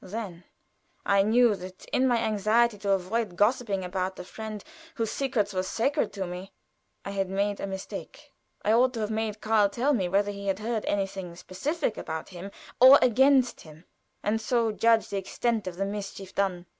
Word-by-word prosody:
Then 190 Hz, -3 st, -6 dB, 0.6 s
I 200 Hz, -1 st, +4 dB
knew 230 Hz, +3 st, +4 dB
that 185 Hz, 0 st, -10 dB
in 260 Hz, -, +3 dB
my 245 Hz, -2 st, +3 dB
anxiety 220 Hz, +1 st, +2 dB
to 200 Hz, 0 st, -3 dB
avoid 195 Hz, +1 st, 0 dB
gossiping 205 Hz, -2 st, +1 dB
about 185 Hz, +1 st, -2 dB
the -, -, -8 dB
friend 215 Hz, +2 st, -7 dB, 0.3 s
whose 225 Hz, -3 st, -2 dB
secrets 215 Hz, -7 st, -1 dB
were 185 Hz, -, 0 dB
sacred 235 Hz, +10 st, 0 dB
to 195 Hz, -2 st, -3 dB
me, 180 Hz, +2 st, -8 dB, 0.5 s
I 200 Hz, -, -4 dB
had 195 Hz, -1 st, -1 dB
made 200 Hz, +1 st, -1 dB
a -, -, -3 dB
mistake. 190 Hz, 0 st, -8 dB, 0.3 s
I 215 Hz, -, +4 dB
ought 250 Hz, +2 st, +3 dB
to 225 Hz, -, -3 dB
have 210 Hz, 0 st, -2 dB
made 220 Hz, -1 st, -2 dB
Karl 215 Hz, -2 st, +3 dB
tell 255 Hz, +8 st, +1 dB
me 190 Hz, -8 st, 0 dB
whether 200 Hz, +2 st, +1 dB
he 200 Hz, 0 st, -7 dB
had 190 Hz, -1 st, +1 dB
heard 220 Hz, +1 st, -3 dB
anything 195 Hz, -3 st, -2 dB
specific 230 Hz, -, -3 dB
about 160 Hz, 0 st, -5 dB
him 185 Hz, +1 st, -8 dB, 0.3 s
or 260 Hz, +3 st, +10 dB
against 255 Hz, +1 st, +4 dB
him, 155 Hz, +2 st, -15 dB, 0.4 s
and 220 Hz, +2 st, 0 dB
so 230 Hz, 0 st, +1 dB
judge 225 Hz, +1 st, +3 dB
the 200 Hz, -, -2 dB
extent 220 Hz, +2 st, -1 dB
of 180 Hz, -, -4 dB
the 195 Hz, +2 st, -1 dB
mischief 195 Hz, -1 st, -6 dB
done. 185 Hz, -3 st, -1 dB
205 Hz, 185 wpm, -27 LUFS, 190-230 Hz, 0.6 s, or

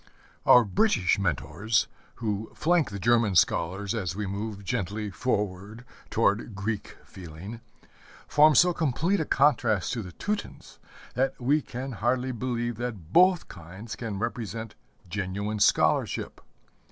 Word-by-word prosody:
Our 125 Hz, -, +8 dB
British 100 Hz, -, +2 dB
mentors, 105 Hz, +2 st, 0 dB, 0.3 s
who 110 Hz, -1 st, -3 dB
flank 170 Hz, -3 st, +2 dB
the 100 Hz, -, -6 dB
German 115 Hz, -1 st, +2 dB
scholars 95 Hz, +4 st, +1 dB
as 95 Hz, -6 st, -3 dB
we 105 Hz, +1 st, -3 dB
move 100 Hz, +1 st, -5 dB
gently 105 Hz, -1 st, -3 dB
forward 105 Hz, +1 st, -3 dB, 0.2 s
toward 105 Hz, +1 st, +1 dB
Greek 100 Hz, +2 st, -4 dB
feeling, 95 Hz, +6 st, -10 dB, 0.7 s
form 150 Hz, 0 st, +5 dB
so 180 Hz, +6 st, +6 dB
complete 165 Hz, +5 st, 0 dB
a 160 Hz, -, 0 dB
contrast 125 Hz, -10 st, +2 dB
to 120 Hz, -, -2 dB
the 90 Hz, -3 st, -8 dB
Teutons 210 Hz, -, -5 dB, 0.3 s
that 130 Hz, +2 st, -1 dB
we 140 Hz, +5 st, +2 dB
hardly 130 Hz, -1 st, -2 dB
believe 120 Hz, -1 st, -3 dB
that 110 Hz, -9 st, -6 dB
both 180 Hz, -1 st, +5 dB
kinds 95 Hz, +6 st, -9 dB
can 110 Hz, -3 st, -5 dB
represent 115 Hz, 0 st, -4 dB, 0.3 s
genuine 100 Hz, +3 st, -3 dB
scholarship. -, -, +2 dB
110 Hz, 125 wpm, -27 LUFS, 100-125 Hz, 0.7 s, Our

